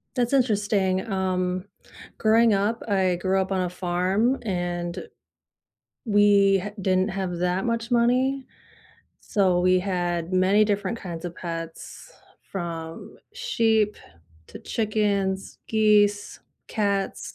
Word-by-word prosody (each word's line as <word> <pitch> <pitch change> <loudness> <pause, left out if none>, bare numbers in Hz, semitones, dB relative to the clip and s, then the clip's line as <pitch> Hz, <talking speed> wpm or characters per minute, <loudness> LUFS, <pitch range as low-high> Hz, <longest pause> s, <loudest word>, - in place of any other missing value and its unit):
That's 245 -1 0
interesting, 205 -5 +1
um, 185 -1 -1 0.5
growing 225 +1 +4
up, 205 +3 0
I 190 -3 +2
grew 190 +2 0
up 190 +1 -2
on 190 - 0
a 180 -1 -1
farm 185 +7 0
and 175 -3 -3 1.1
we 200 -3 +4 0.2
didn't 185 +1 +1
have 190 -2 -3
that 180 +2 0
much 230 0 -2
money, 255 +3 +2 0.8
so 185 -4 +1
we 185 0 +4
had 175 -2 -2
many 190 +3 +4
different 205 +1 -1
kinds 175 -5 -7
of 175 -1 -5
pets 165 -2 -7 0.4
from 165 -3 -6 0.2
sheep 225 - +1 0.5
to - - -11
chickens, 205 -3 -1
geese, 210 -2 +2 0.3
cats 200 -3 -2
195 Hz, 110 wpm, -25 LUFS, 180-215 Hz, 1.1 s, growing